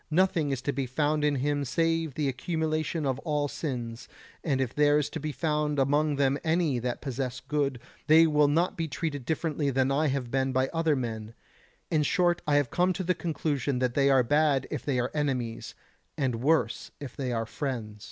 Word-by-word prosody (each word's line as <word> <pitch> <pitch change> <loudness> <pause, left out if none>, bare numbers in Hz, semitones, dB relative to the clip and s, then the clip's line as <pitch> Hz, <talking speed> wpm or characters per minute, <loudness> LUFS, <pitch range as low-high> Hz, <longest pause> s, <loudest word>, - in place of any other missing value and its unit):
Nothing 165 -2 +2
is 135 -2 -2
to 140 - -1
be 135 0 -2
found 150 +3 0
in 150 -1 +2
him 145 +2 0
save 165 +2 0
the 150 -2 0
accumulation 155 +3 -1
of 135 -1 -1
all 150 -2 -1
sins, 120 -6 -5 0.4
and 140 -5 0
if 130 -2 -1
there 145 0 +4
is 150 0 -1
to 160 - -4
be 155 +1 -3
found 150 0 -1
among 145 +2 +2
them 140 0 +1
any 160 -5 +1
that 120 0 -3
possess 130 -2 -3
good, 140 -2 -1 0.3
they 160 +2 +7
will 150 -2 +4
not 165 +5 +1
be 165 -1 -2
treated 145 -3 -4
differently 155 -2 -1
than 135 0 +1
I 150 +3 +2
have 130 -3 -2
been 135 0 0
by 130 0 +1
other 165 -2 +1
men; 115 -3 -4 0.6
in 155 -2 +3
short 175 +2 +2
I 145 - +3
have 145 -4 +2
come 180 +1 +2
to 190 - -3
the 180 +1 +2
conclusion 150 -5 -2
that 125 -1 0
they 140 +1 +3
are 135 -2 +5
bad 145 +1 +2
if - - -3
they 135 -4 0
are 125 +1 -1
enemies, 130 -6 -2 0.4
and 125 -5 -1
worse 135 -5 +1
if 140 -4 -8
they 130 -3 -3
are 115 -1 -1
friends. 115 -5 -4
145 Hz, 200 wpm, -28 LUFS, 130-155 Hz, 0.6 s, they